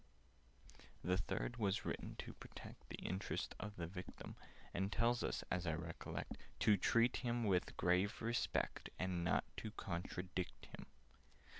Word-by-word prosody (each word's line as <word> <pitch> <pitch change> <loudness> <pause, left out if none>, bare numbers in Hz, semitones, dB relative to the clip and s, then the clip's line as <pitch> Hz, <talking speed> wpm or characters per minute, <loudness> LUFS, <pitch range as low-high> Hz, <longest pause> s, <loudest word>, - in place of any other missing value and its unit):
"The 90 - +4
Third 120 +4 -1
was 100 -4 +2
written - - -2
to - - -5
protect - - -10
The - - -3
interests 95 +2 -1
of 105 -1 -4
the 85 - -2
Victim, 90 +1 -6 0.4
And 95 +3 +1
tells 120 +2 +3
us, - - 0
as 90 -1 +1
I 80 - +3
recollect, 85 +1 -4 0.2
To 105 - +7
treat 115 +5 +5
him 120 -1 +1
with 95 -4 +4
a - - -11
grave 90 +4 +3
respect, 115 +1 +1
And 90 -2 0
not 85 - +4
to 110 - -2
contradict 90 -2 -3
him." - - -9
95 Hz, 150 wpm, -41 LUFS, 90-110 Hz, 0.4 s, To